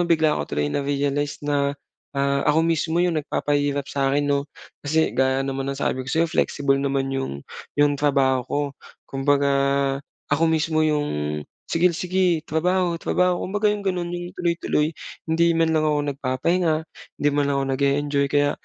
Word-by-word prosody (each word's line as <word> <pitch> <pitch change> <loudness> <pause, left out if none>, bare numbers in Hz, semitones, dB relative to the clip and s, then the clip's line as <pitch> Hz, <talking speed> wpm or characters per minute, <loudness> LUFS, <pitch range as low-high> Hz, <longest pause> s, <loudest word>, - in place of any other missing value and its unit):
bigla 160 -2 +3
ko - - -5
tuloy 75 0 -1
na-realize 145 +1 -1
na, 140 -1 0 0.4
ah, 140 0 +1
ako 160 +2 +3
mismo 165 0 0
'yong 165 -3 +1
nagpapahirap 145 -1 -1
sa'kin 140 +1 0
'no, 140 0 0 0.3
kasi 160 +2 +1
gaya 130 +1 +1
naman 135 0 -3
ng 140 - -3
sabi 130 - 0
ko 130 - -7
sa'yo 165 +3 +2
flexible 140 -4 +1
naman 135 -1 -1
'yong 135 - -4 0.3
'yong 145 0 +4
trabaho 135 -3 +3
ko, 145 - 0 0.4
kumbaga 140 +1 +1 0.8
ako 165 - +2
mismo 160 -1 +1
'yong, 75 - -1 0.3
"Sigel 175 +1 +3
sige, 180 -2 +1
trabaho, 175 +2 +1
trabaho," 180 -1 +1
kumbaga 205 +3 +1
yung 205 -1 -5
ganun 180 -3 -1
yung 175 0 -5
tuloy-tuloy 170 -3 0 0.4
hindi 170 +1 +3
man 165 -1 +2
lang 155 -1 +2
ako 150 -1 +2
nagpapahinga, 155 +6 0 0.5
hindi 145 - +3
man 145 0 +2
lang 140 - +1
ako - - 0
nag-e-enjoy, 140 +1 +1
kaya 145 0 +2
145 Hz, 160 wpm, -23 LUFS, 140-165 Hz, 0.8 s, yong